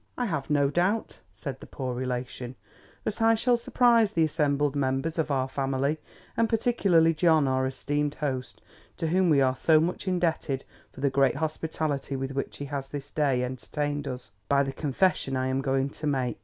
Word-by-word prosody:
I 245 - 0
have 155 - -3
no 145 -2 +3
doubt 180 - 0
(said 130 +7 -6
the - - -11
poor 130 -2 -4
relation) 125 0 -4 0.5
that 215 +1 -3
I 225 0 +5
shall 240 +2 +2
surprise 235 -2 +3
the 165 - +3
assembled 145 -2 +1
members 135 +4 -1
of 160 - 0
our 135 -2 +1
family, 135 +3 -1 0.4
and 230 -1 +2
particularly 195 -8 +3
John 160 -3 +3
our 130 0 +1
esteemed 145 +2 -1
host 130 -5 -4 0.3
to 165 - -1
whom 185 +1 +3
we 145 -3 +5
are 130 -1 +3
so 155 +3 +4
much 175 +4 -2
indebted 165 -7 0 0.3
for 130 - -11
the 140 -1 +2
great 135 -1 +3
hospitality 155 -3 -2
with 135 0 -3
which 135 0 -4
he 145 - -5
has 140 -1 -4
this 145 0 -7
day 135 -5 +1
entertained 145 +3 -3
us, 125 -5 -6 0.2
by 140 0 +4
the 135 -1 -4
confession 140 -2 0
I 130 0 0
am 130 +1 0
going 135 0 0
to 155 - -5
make. 130 -4 -1
145 Hz, 185 wpm, -27 LUFS, 135-165 Hz, 0.5 s, I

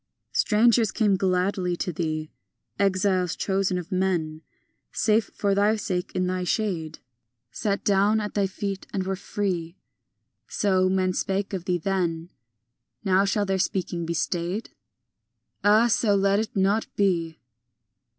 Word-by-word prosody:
IV - - -3
Strangers 225 0 +4
came 210 -3 +2
gladly 185 -1 0
to 180 - -3
thee, 155 -1 -3 0.5
Exiles, 185 -2 +1
chosen 190 -2 0
of 180 +2 -6
men, 175 -4 -1 0.5
Safe 215 -1 +1
for 200 -1 +1
thy 205 +2 +3
sake 190 -4 -3
in 185 - +1
thy 185 0 -1
shade, 175 -5 -2 0.5
Sat 200 - -2
down 205 +2 +3
at 210 -1 -4
thy 200 -2 +1
feet 195 0 -5
and 190 -1 -2
were 190 0 -1
free. 185 -3 -3 0.7
So 185 -2 +1
men 185 -1 +1
spake 195 +2 -2
of 180 -2 -4
thee 180 -1 +1
then; 175 -2 -2 0.7
Now 190 +1 +4
shall 205 +1 +1
their 190 -1 0
speaking 180 -3 -2
be 170 - -2
stayed? 175 +6 -2 0.9
Ah, 210 +3 +5
so 225 -3 +2
let 200 +1 +3
it 220 - -4
not 200 +3 +2
be! 170 -5 0
190 Hz, 140 wpm, -25 LUFS, 180-200 Hz, 0.9 s, Ah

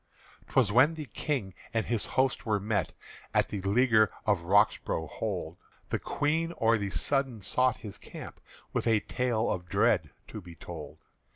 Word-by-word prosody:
'T - - -17
was 120 -7 +4
when 135 +8 +5
the 155 -2 -5
King 125 -9 -3 0.2
and 115 - +1
his 115 -3 0
host 130 0 +2
were 105 -2 +1
met 105 +1 -1 0.4
At - - +3
the 100 - -4
leaguer 110 +2 +4 0.2
of 100 -5 +1
Roxbro' 100 -4 +2
hold, 90 -6 -4 0.3
The - - 0
Queen 160 +3 -1
o' 115 0 +4
the 100 -2 -2
sudden 130 - 0
sought 125 +6 +2
his 100 - -7
camp - - -10 0.3
With - - -1
a 110 -2 +4
tale 120 -3 0
of 90 -1 -4
dread - - +2 0.2
to 105 - -7
be 85 -2 -12
told. 80 -2 -9
110 Hz, 170 wpm, -29 LUFS, 95-125 Hz, 0.4 s, when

